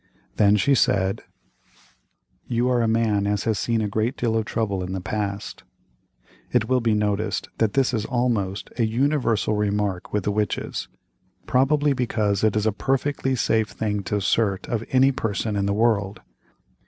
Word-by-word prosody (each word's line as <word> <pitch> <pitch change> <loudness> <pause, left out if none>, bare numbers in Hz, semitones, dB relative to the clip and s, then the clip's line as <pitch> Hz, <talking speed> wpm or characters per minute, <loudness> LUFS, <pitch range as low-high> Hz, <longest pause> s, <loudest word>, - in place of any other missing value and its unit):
Then 105 0 +5
she 140 +7 +3
said: 95 -6 +2 1.3
"You 120 +1 0
are 125 -1 +2
a 115 - +1
man 110 -3 +1
as 105 0 0
has 110 -4 0
seen 115 -1 0
a 105 - 0
great 110 +4 -1
deal 115 -2 0
of 110 -1 0
trouble 105 -5 -2
in 90 +1 -5
the 95 - -2
past." 100 +2 -4 0.9
It 115 -3 +2
will 130 0 +2
be 115 -2 +2
noticed 105 0 -1
that 110 -3 +2
this 135 -2 +2
is 110 -3 0
almost 115 -7 -1
a - - +3
universal 120 -2 +1
remark 105 -3 -1
with 105 -2 -1
the 105 - 0
witches, 105 0 -2 0.6
probably 145 +3 +2
because 110 -6 0
it 110 -1 +3
is 105 0 +1
a 110 - +3
perfectly 135 +4 -1
safe 110 -2 +1
thing 105 -2 -2
to - - -2
assert 100 0 0
of 115 -2 -2
any 130 +1 +4
person 110 -3 -2
in 100 -1 0
the - - +1
world. 105 -2 +1
110 Hz, 170 wpm, -23 LUFS, 100-120 Hz, 1.3 s, Then